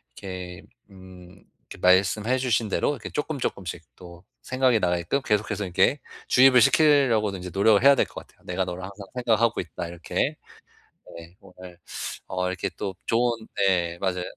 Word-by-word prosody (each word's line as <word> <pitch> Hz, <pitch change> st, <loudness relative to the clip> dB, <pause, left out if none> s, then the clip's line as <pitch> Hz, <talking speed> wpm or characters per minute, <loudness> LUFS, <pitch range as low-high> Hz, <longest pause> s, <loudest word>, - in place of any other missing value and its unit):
이렇게 90 Hz, -2 st, -8 dB, 0.3 s
음 95 Hz, 0 st, -15 dB, 0.3 s
이렇게 -, -, -10 dB
말씀해 100 Hz, +7 st, +3 dB
주신 115 Hz, -4 st, 0 dB
대로 -, -, 0 dB
이렇게 145 Hz, -, -7 dB
쪼끔쪼끔씩 110 Hz, -, -4 dB
또 85 Hz, 0 st, -13 dB, 0.2 s
생각이 130 Hz, -3 st, +1 dB
나게끔 90 Hz, +9 st, 0 dB
계속해서 105 Hz, -2 st, -1 dB
이렇게 125 Hz, +10 st, +2 dB, 0.3 s
주입을 125 Hz, -1 st, +6 dB
시키려고는 120 Hz, -8 st, +3 dB
이제 90 Hz, 0 st, -7 dB
노력을 100 Hz, +3 st, +4 dB
해야 140 Hz, 0 st, +7 dB
될 -, -, +2 dB
것 -, -, -10 dB
같아요. -, -, -28 dB
'내가 90 Hz, +1 st, -1 dB
너를 90 Hz, +1 st, -6 dB
항상 100 Hz, +1 st, -9 dB
생각하고 115 Hz, -1 st, +1 dB
있다.' 85 Hz, -1 st, -5 dB
이렇게. 85 Hz, 0 st, -3 dB, 0.8 s
네, 85 Hz, +2 st, -12 dB
오늘 90 Hz, -1 st, -14 dB, 0.5 s
어 90 Hz, 0 st, -2 dB
이렇게 95 Hz, 0 st, -3 dB
또 95 Hz, -2 st, -4 dB
좋은 120 Hz, +1 st, +2 dB, 0.2 s
네, 90 Hz, -4 st, +1 dB
맞아요. 90 Hz, -2 st, -2 dB
95 Hz, 355 characters per minute, -25 LUFS, 90-120 Hz, 0.8 s, 해야